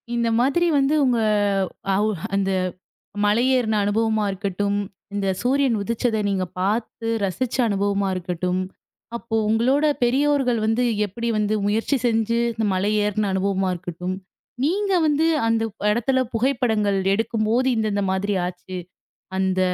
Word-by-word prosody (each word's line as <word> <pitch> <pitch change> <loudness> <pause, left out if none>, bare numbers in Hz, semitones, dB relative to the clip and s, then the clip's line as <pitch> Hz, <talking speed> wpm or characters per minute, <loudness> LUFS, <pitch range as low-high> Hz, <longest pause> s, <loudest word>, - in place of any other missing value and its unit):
இந்த 235 -1 +1
மாதிரி 280 +8 +2
வந்து 275 +1 +2
உங்க 245 -3 +2 0.8
அவுஹ் 205 -4 0
அந்த 195 -1 +1 0.7
மலையேறுன 235 +1 +2
அனுபவமா 220 +1 +1
இருக்கட்டும், 200 +1 -2 0.4
இந்த 200 -1 -1
சூரியன் 265 0 +2
உதிச்சத 230 +2 -1
நீங்க 190 -2 0
பார்த்து 220 +4 -2 0.2
ரசிச்ச 200 +6 -2
அனுபவமா 200 -1 0
இருக்கட்டும், 180 +1 -2 0.6
அப்போ 235 -1 -5
உங்களோட 255 +7 +2 0.2
பெரியோர்கள் 265 -1 +2
வந்து 225 +3 +1 0.2
எப்படி 235 +4 -5
வந்து 210 0 +1
முயற்சி 225 +7 +1
செஞ்சு 230 0 +1
இந்த 225 0 -1
மலையேறுன 210 +1 0
அனுபவமா 190 0 0
இருக்கட்டும், 180 +1 -5 0.5
நீங்க 395 +7 +1
வந்து 305 +1 +2 0.2
அந்த 225 0 +1 0.3
இடத்துல 245 +4 +1
புகைப்படங்கள் 225 -5 +1 0.2
எடுக்கும்போது, 225 +3 +1
இந்த 220 -1 +1
இந்த 200 0 0
மாதிரி 200 +2 -1
ஆச்சு 180 +1 -7 0.6
அந்த 190 -1 +1
220 Hz, 120 wpm, -22 LUFS, 200-240 Hz, 0.8 s, மாதிரி